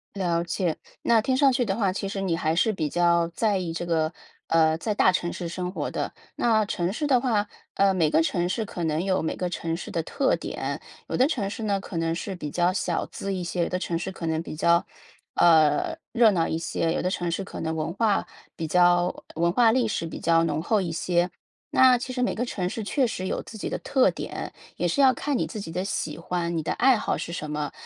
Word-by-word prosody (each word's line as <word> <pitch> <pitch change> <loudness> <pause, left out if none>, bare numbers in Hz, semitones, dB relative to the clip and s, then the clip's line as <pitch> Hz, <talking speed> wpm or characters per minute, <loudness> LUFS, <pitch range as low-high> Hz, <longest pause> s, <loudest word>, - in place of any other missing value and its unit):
了 170 -3 0
解。 175 -1 -1 0.3
那 230 -2 +4
听 260 +4 +1
上 275 -1 +5
去 250 0 +2
的 195 -3 -1
话， 200 -4 +1
其 200 0 -3
实 195 - -4
你 185 -4 0
还 160 -1 0
是 220 +5 +2
比 155 -6 -2
较 170 0 +3
在 205 +4 +1
意 180 -3 -3
这 170 +1 -4
个 160 -2 +1 0.4
呃， 160 -1 +3
在 210 +6 -2
大 190 - +4
城 175 -1 -1
市 175 - -5
生 180 +1 -4
活 - - -3
的。 - - -3 0.2
那 220 -3 +2
城 180 -3 -1
市 295 +8 -2
的 255 -4 +4
话， 220 -5 +1 0.3
呃， 195 -1 +4
每 165 -5 +2
个 160 - +3
城 175 +1 0
市 220 +4 -1
可 175 -4 -5
能 160 0 0
有 190 -1 +1
每 160 - -2
个 180 - -2
城 165 -1 -3
市 - - -7
的 165 - -2
特 265 - +1
点， - - -4 0.3
有 - - -3
的 255 - +4
城 230 -11 -1
市 220 +2 -6
呢， 200 -2 +1
可 195 - -9
能 165 0 0
是 190 +3 -4
比 150 -5 -6
较 175 +3 +2
小 - - -1
资 195 0 -5
一 185 - -3
些， 175 0 -1
有 - - -2
的 180 - -1
城 170 -2 -2
市 175 +3 -4
可 180 -3 -7
能 160 0 -1
比 - - -7
较， 170 +2 +3 0.5
呃， 160 - +4 0.2
热 230 -3 +5
闹 170 -4 +1
一 160 - -1
些， 165 0 -1
有 - - -1
的 180 - 0
城 175 -2 -2
市 190 +3 -2
可 - - -7
能 160 0 -2
文 160 +1 -2
化 210 0 +1 0.3
比 165 - -3
较 175 +1 +3
文 170 +2 +1
化 235 0 +5
历 245 -1 +2
史 190 - -2
比 165 - -6
较 165 0 +3
浓 165 - 0
厚 210 +4 +1
一 175 -3 -3
些。 175 +2 +1 0.4
那 255 -1 +6
其 250 +1 -5
实 250 0 -2
每 250 - +1
个 245 - -1
城 185 -7 -2
市 225 - -4
确 255 +5 +1
实 185 -4 -4
有 - - -2
自 220 - -10
己 - - -4
的 - - -2
特 265 -2 +2
点， - - -6 0.2
也 - - -2
是 225 - -1
要 265 -2 +6
看 290 0 -1
你 - - -1
自 215 - -6
己 165 - -7
的 180 +3 -2
喜 155 -6 -3
欢， 170 0 -2
你 - - 0
的 155 - -2
爱 260 -1 +4
好 - - -1
是 - - -5
什 155 -3 -5
么。 150 -1 -3
180 Hz, 270 characters per minute, -26 LUFS, 165-215 Hz, 0.5 s, 那